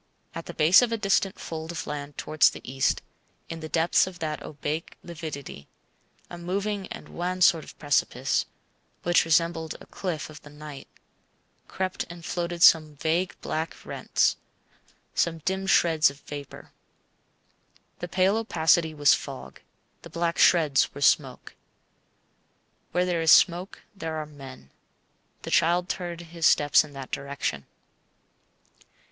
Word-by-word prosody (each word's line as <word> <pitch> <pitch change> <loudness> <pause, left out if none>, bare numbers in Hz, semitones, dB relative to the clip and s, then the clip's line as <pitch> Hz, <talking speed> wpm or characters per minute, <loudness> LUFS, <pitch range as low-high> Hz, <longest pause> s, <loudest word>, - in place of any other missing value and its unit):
At - - -7
the - - -6
base 165 +8 +6
of 245 -2 0
a 230 - 0
distant 195 -2 +1
fold 160 0 -6
of 170 - -5
land 145 -1 -6
towards 155 -5 +3
the - - -10
east, 135 +1 0 0.5
in 165 - -6
the 155 -1 -7
depths 165 +3 +3
of 185 -1 -8
that 155 -2 -4
opaque 150 +2 -5
lividity 155 - -8 0.6
(a 175 - -9
moving 195 +3 -3
and - - -9
wan 180 +2 -3
sort 165 -3 +5
of - - -13
precipice, 145 -2 0 0.6
which 175 -1 +3
resembled 165 0 +1
a - - -13
cliff 175 -6 -4
of 150 - -12
the 145 - -14
night), 150 -1 -10 0.8
crept 185 -1 -3
and 170 -1 -10
floated 175 -1 -2
some 155 -2 +6
vague 165 +5 -1
black 160 +1 -3
rents, - - 0 0.8
some 170 -1 +1
dim 190 +1 -1
shreds 160 -5 +4
of 140 +1 -13
vapour. 145 -2 -9 1.3
The 175 - -4
pale 185 +4 +2
opacity 160 -6 +2
was 145 -1 +5
fog, 65 +1 -6 0.4
the - - -11
black 170 0 -2
shreds 155 -8 +4
were 140 - -8
smoke. 140 - +1 1.4
Where 180 +1 +1
there 175 -2 0
is 160 -1 +4
smoke 180 +2 +4
there 165 -5 -5
are 155 -1 -3
men. 135 - -12 0.7
The - - -6
child 175 +2 +2
turned 175 -2 -4
his 165 -1 0
steps 145 -1 +5
in 150 -2 -13
that 135 -1 -8
direction. 140 - -4
165 Hz, 145 wpm, -26 LUFS, 150-175 Hz, 1.4 s, base